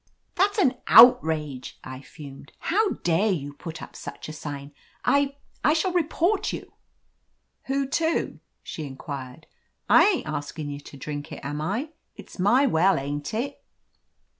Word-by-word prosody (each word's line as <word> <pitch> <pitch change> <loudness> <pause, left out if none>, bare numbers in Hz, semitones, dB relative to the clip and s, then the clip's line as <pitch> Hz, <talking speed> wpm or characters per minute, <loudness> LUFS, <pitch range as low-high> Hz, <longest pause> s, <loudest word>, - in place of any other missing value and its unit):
"That's 405 +3 +2
an 265 -11 +3
outrage," 160 - +5
I 130 0 -8
fumed. 140 -1 -12
"How 410 +4 +1
dare 175 +6 +2
you 145 -5 -3
put 165 +2 -8
up - - -11
such - - -8
a 155 - -7
sign! 145 -2 -7 0.3
I 280 0 +2
— - - -37
^I 300 - +4
shall 350 +3 0
report 350 +4 +1
you!" - - -8 0.9
"Who 275 0 0
to 320 +4 -1
?" - - -50
she 160 - -6
inquired. 135 +1 -8 0.4
"I - - +7
ain't 375 - 0
askin' 145 0 -4
you 140 - -6
to 140 - -12
drink 145 +1 -6
it, - - -7
am 145 +1 -3
I? 210 - -2 0.3
It's - - -13
my 240 +9 +4
well, 190 -4 +3
ain't 145 +1 -4
it 275 +5 -3
165 Hz, 160 wpm, -25 LUFS, -, 0.9 s, I